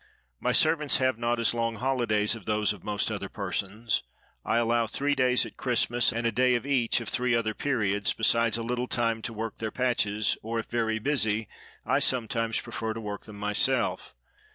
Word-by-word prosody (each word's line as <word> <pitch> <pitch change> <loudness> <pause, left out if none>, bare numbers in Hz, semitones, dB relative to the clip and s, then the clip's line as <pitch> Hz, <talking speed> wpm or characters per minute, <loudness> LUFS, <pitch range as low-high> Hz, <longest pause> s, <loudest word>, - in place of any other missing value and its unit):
My - - 0
servants 150 -3 +3
have 130 -3 +1
not 120 0 0
as 115 - +3
long 115 -1 -1
holidays 120 -4 +1
as 110 - -11
those 105 -1 +1
of 100 - -14
most 105 -1 -1
other - - -4
persons. 105 +3 -2 0.4
I 115 - +1
allow 115 0 +2
three 140 +6 0
days 125 -2 +3
at - - -11
Christmas, 120 -1 +2
and 115 0 -3
a 115 - +2
day 125 +2 +3
at 120 - -2
each 125 -4 +1
of 115 - -7
three 125 -1 +1
other 110 -2 0
periods, 105 -7 0
besides 115 0 +2
a 115 - -4
little 125 +2 -2
time 115 -2 0
to 115 - -4
work 110 -1 -5
their 110 - -2
patches; 110 -4 0
or, 115 +1 -4
if 115 - -2
very 115 -2 -1
busy, 110 -4 0 0.4
I - - +2
sometimes 115 -2 +1
prefer 110 -1 -4
to - - -5
work 105 -2 -6
them 105 - -10
myself. 105 -10 0
115 Hz, 195 wpm, -27 LUFS, 110-125 Hz, 0.4 s, servants